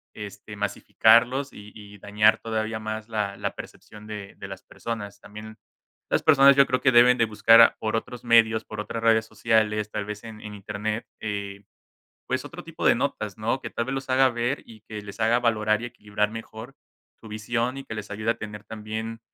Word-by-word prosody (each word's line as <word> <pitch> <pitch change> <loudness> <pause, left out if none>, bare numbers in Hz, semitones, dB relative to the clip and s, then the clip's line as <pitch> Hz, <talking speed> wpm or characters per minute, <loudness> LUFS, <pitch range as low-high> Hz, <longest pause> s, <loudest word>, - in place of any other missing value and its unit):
este, 105 0 -9
masificarlos 115 +6 +2
y 105 0 -12
y 105 -1 -12
dañar 105 +2 +3
todavía 110 0 -3
más 110 0 -5
la 105 -3 -2
la - - -3
percepción 105 0 -11
de 105 -2 -7
de - - -7
las 95 0 -9
personas. 105 -3 -6
También, 110 +1 -11 0.5
las - - +2
personas 140 -2 +7
yo 140 -1 +6
creo 130 -1 0
que 135 - +4
deben 125 +1 +7
de 115 - +4
buscar 115 +2 +6
por 110 0 -1
otros 120 +1 -5
medios, 115 -2 +4
por 110 -1 -6
otras 115 +1 -5
redes 110 -1 +4
sociales, 110 -2 +1
tal 105 - -3
vez 105 +1 -7
en 110 -1 -10
en 105 -1 -8
Internet, 105 +2 -4
eh, 100 -1 -5 0.6
pues - - -2
otro - - -9
tipo - - -7
de - - +6
notas, - - -3
¿no?, - - -1
que - - -6
tal 120 - -3
vez 130 - -3
los 135 0 -5
haga 130 +1 +5
ver 120 +3 -2
y 110 -2 -14
que 110 -1 -8
les 100 0 -10
haga 115 +2 +3
valorar 110 -2 +1
y - - -3
equilibrar 105 -2 -2
mejor 115 +3 -9 0.5
su 110 - -12
visión, 115 +4 -2
y 135 - -8
que - - -7
les 105 -1 -7
ayude 110 +2 -1
a - - -17
tener 105 -1 -8
también 110 +1 -6
110 Hz, 200 wpm, -25 LUFS, 105-115 Hz, 0.6 s, personas